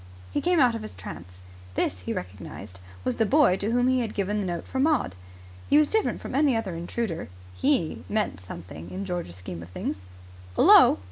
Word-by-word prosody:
He - - 0
came 355 -1 +3
out 250 -4 +5
of 230 - -4
his 215 - -8
trance. 90 +1 -10 0.3
This, 90 - 0
he 90 - -5
recognized, 90 0 -7 0.2
was 125 - -1
the - - +3
boy 285 -7 +5
to 200 +2 -2
whom 245 +2 +2
he 260 0 +3
had 230 -3 -3
given 205 +1 0
the 195 - -2
note 170 -2 -4
for 265 - -3
Maud. 295 - +2 0.6
He 290 - +6
was 305 0 +5
different 440 -1 +1
from - - -6
any 280 -2 +3
other 205 -5 -3
intruder. 170 - -3 0.2
He 260 - 0
meant 215 - 0
something 85 -2 -9
in 195 +2 -5
George's 175 - -4
scheme 90 -2 -7
of 85 - -10
things. 90 0 -5 0.5
"'Ullo!" - - +8
195 Hz, 200 wpm, -26 LUFS, -, 0.6 s, Ullo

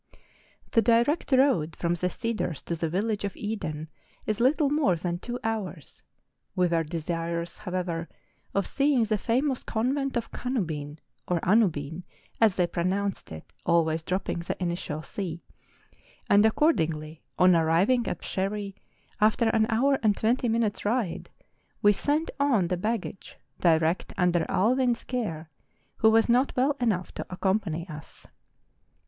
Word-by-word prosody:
The 230 - +4
direct 235 +8 +2
road 255 - +3
from 170 0 0
the 180 +1 -1
cedars 215 -7 -3
to 170 - -3
the 165 0 -2
village 205 +5 -1
of 200 - -4
Eden 160 -8 -4 0.4
is 215 0 -1
little 280 +4 +3
more 290 - +3
than 175 +1 -3
two 245 +5 -5
hours; 210 - -4 0.5
we 180 -2 +3
were 165 -1 +1
de¬ 165 +2 -4
sirous, 170 +1 -3
however, 180 -4 -3 0.5
of 200 - +2
seeing 275 -3 +2
the 215 -1 0
famous 260 +4 0
Convent 265 +4 -1
of 230 - -4
Canubin 160 - -3 0.3
(or 175 -1 +1
Anubin, 175 -6 +2 0.4
as 215 -4 +5
they 180 - +2
pronounced 185 +3 -2
it, 80 +3 -10
always 160 -1 +2
dropping 180 +1 -2
the 170 - -4
initial 170 -3 -3
C), 170 -3 -5 0.8
and 205 +1 +5
accordingly, 160 - 0 0.2
on 180 -1 +6
arriving 175 +10 +3
at - - -4
Psherre, 195 +1 -2 0.5
after 220 +2 +3
an 220 -1 +2
hour 265 +4 +2
and 210 -3 +2
twenty 240 +2 +1
minutes' 225 -2 0
ride, 215 -4 -1 0.5
we 205 0 +6
sent 295 - 0
on 240 -11 +2
the 180 - +1
baggage 210 0 -4 0.2
direct 165 0 +2
under 175 -2 +2
Allwyn's 240 +4 +2
care, 165 -11 -4 0.5
who 220 - +5
was 225 0 +4
not 250 +3 +2
well 275 +3 +3
enough 210 -7 0
to - - -5
accompany 185 -3 -1
us. 155 -3 -11
200 Hz, 145 wpm, -27 LUFS, 170-230 Hz, 0.8 s, on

